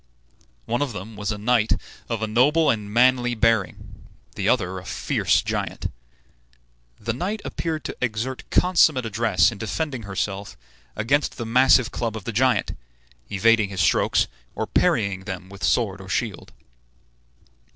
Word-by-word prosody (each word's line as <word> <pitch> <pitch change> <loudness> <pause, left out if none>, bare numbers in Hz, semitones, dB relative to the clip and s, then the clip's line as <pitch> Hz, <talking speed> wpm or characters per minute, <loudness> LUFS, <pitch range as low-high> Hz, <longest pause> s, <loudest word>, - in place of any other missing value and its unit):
One 120 - -1
of 140 -5 -1
them 105 +2 -8
was 105 +1 -3
a 105 - -3
knight 115 +1 +2 0.4
of 115 -2 -2
a - - 0
noble 145 +8 +4
and 105 -3 -4
manly 125 +1 +3
bearing, 110 -6 0 0.3
the 100 +1 -1
other 95 -6 +1
a - - -12
fierce - - 0
giant. - - -3 1.1
The 115 +2 -2
knight 190 - -3
appeared 160 -2 -3
to - - -5
exert 125 +2 -3
consummate 160 -8 +3
address 110 -1 +2
in 110 - -9
defending 130 +4 -3
herself 100 0 -4 0.4
against 140 +7 0
the 120 - -4
massive 125 +1 +4
club 115 -2 -3
of 105 - -8
the 115 - -4
giant, 125 -1 +1 0.6
evading 110 +1 +3
his 95 -2 -2
strokes, - - +3 0.3
or - - -2
parrying 95 -2 +1
them 95 -2 -6
with 100 -2 -11
sword 95 +4 +1
or 95 - -11
shield. 105 -3 -3
115 Hz, 150 wpm, -23 LUFS, 100-125 Hz, 1.1 s, noble